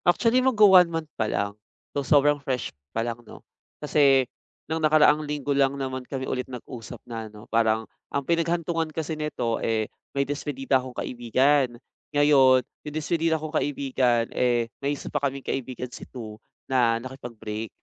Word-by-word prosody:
Actually, 230 +8 +4
magwa-one 205 -8 +6
month 165 -2 -4
palang, 100 -2 -1 0.4
so 140 - 0
sobrang 145 +1 +3
fresh 130 -3 -3 0.2
palang, 115 +1 -3
'no? 115 - -14 0.3
Kasi 140 -3 +4 0.4
nung 160 +1 -2
nakaraang 155 -1 +5
linggo 145 -1 -2
lang 140 0 +2
naman 130 -1 -3
kami 130 -1 -3
ulit 130 0 -3
nag-usap 125 -1 -8
na 115 -2 -6
ano, 105 0 -13
parang 110 -1 +2 0.2
ang 140 -1 -2
pinaghantungan 165 0 0
kasi 160 0 -4
nito, 150 -7 -2
eh, 110 -1 0 0.3
may 140 - +2
despedida 135 -2 -1
akong 130 -1 -10
kaibigan. 125 +2 +1 0.4
Ngayon, 135 -4 +5
yung 150 0 -11
despidida 160 +1 +1
kong 155 0 -7
kaibigan 130 -5 +1
eh, 120 -2 +1
may 140 +1 -1
1 - - -11
pa 145 - 0
kaming 140 -1 -2
kaibigan 125 -1 -3
si - - -9
2 110 -4 -8 0.3
na 120 -3 +3
nakipag-break. 115 -4 -6
135 Hz, 150 wpm, -25 LUFS, 120-150 Hz, 0.4 s, magwa-one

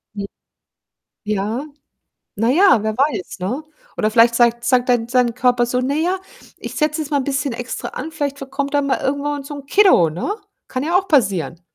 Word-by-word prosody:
Hm. 200 - -4 1.0
Ja, 215 +6 -2 0.7
na 225 +3 +2
ja, 340 - +5
wer 220 0 -2
weiß, 270 - -1
ne? 245 +12 -2 0.3
Oder 215 - +1
vielleicht 230 +1 +5
sagt 235 0 +2
sagt 250 0 +2
dein 235 -2 +2
sein 245 -2 +2
Körper 245 -1 +2
so: 250 +1 0
„Ne, 280 +4 -1
ja, 370 +2 0 0.4
ich - - -7
setze 305 0 0
jetzt 305 -1 -5
mal 285 - +2
'n 260 - -2
bisschen 275 -2 -1
extra 245 +1 -5
an, 315 +5 -6
vielleicht 285 -3 -3
ver 275 - -7
kommt 280 +1 -3
dann 285 -1 +2
mal 275 - 0
irgendwann 285 +1 -2
so 290 +1 -8
'n 280 -1 -9
Kiddo,“ 370 - +5
ne? 185 - -3 0.3
Kann 255 0 -3
ja 340 +4 +1
auch 390 - -4
passieren. 185 - +1
260 Hz, 200 wpm, -19 LUFS, 230-290 Hz, 1.0 s, ja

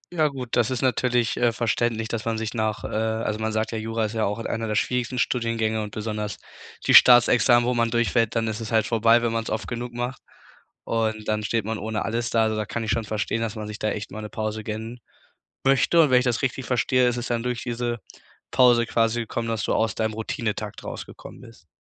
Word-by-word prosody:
Ja 155 -2 +3
gut, 130 -4 -6
das 120 0 +3
ist 130 0 -2
natürlich, 125 -1 +1
äh, 120 -1 +3
verständlich, 115 0 -1
dass 115 -2 -3
man 115 -1 -1
sich 110 +1 -3
nach, 110 -2 -2
äh - - -3
also 110 0 -1
man 110 0 -1
sagt 110 +1 -1
ja, 110 - -3
Jura 115 0 -1
ist 105 - -4
ja 110 -1 0
auch 105 +2 -2
einer 115 0 -3
der 105 - -2
schwierigsten 125 +2 -1
Studiengänge 115 -3 0
und 105 - -4
besonders 105 -1 -4 0.5
die - - +3
Staatsexamen, 120 0 +7
wo 125 - +2
man 115 -1 +1
durchfällt, 115 -1 +1
dann 115 -1 +1
ist 110 +1 -3
es 110 -1 -6
halt 110 -2 +3
vorbei, 115 +1 +3
wenn 115 - +1
man's 115 -1 -2
oft 110 - -3
genug 120 0 -4
macht 120 +1 -4 0.6
und 110 -1 -1
dann 105 0 0
steht 110 -1 -1
man 110 -1 -3
ohne 110 +1 -3
alles 115 +2 -2
da. 115 -1 +3
Also, 110 0 0
da 105 - -1
kann 115 - -3
ich 105 - -1
schon 115 -2 0
verstehen, 110 +2 -2
dass 115 0 -3
man 105 -1 -5
sich 105 - -7
da 110 - 0
echt 105 - -5
mal 110 +2 -6
'ne 105 - -7
Pause 110 0 -4
gönnen 110 +3 -6 0.7
möchte 135 +5 +4
und 150 -4 +5
wenn 125 0 +6
ich - - -2
das 120 -1 +1
richtig 130 0 -1
verstehe, 125 +1 +2
ist 120 - -1
es 120 - -4
dann 120 -1 -1
durch 125 -1 -3
diese 120 -1 -2 0.5
Pause 120 -2 +5
quasi 115 0 +1
gekommen, 115 0 -3
dass 115 -3 -2
du - - 0
aus 110 -3 +1
deinem 110 -1 -1
Routinetakt 110 -2 -4
rausgekommen - - -9
bist? 115 -7 -16
115 Hz, 235 wpm, -24 LUFS, 110-120 Hz, 0.7 s, Staatsexamen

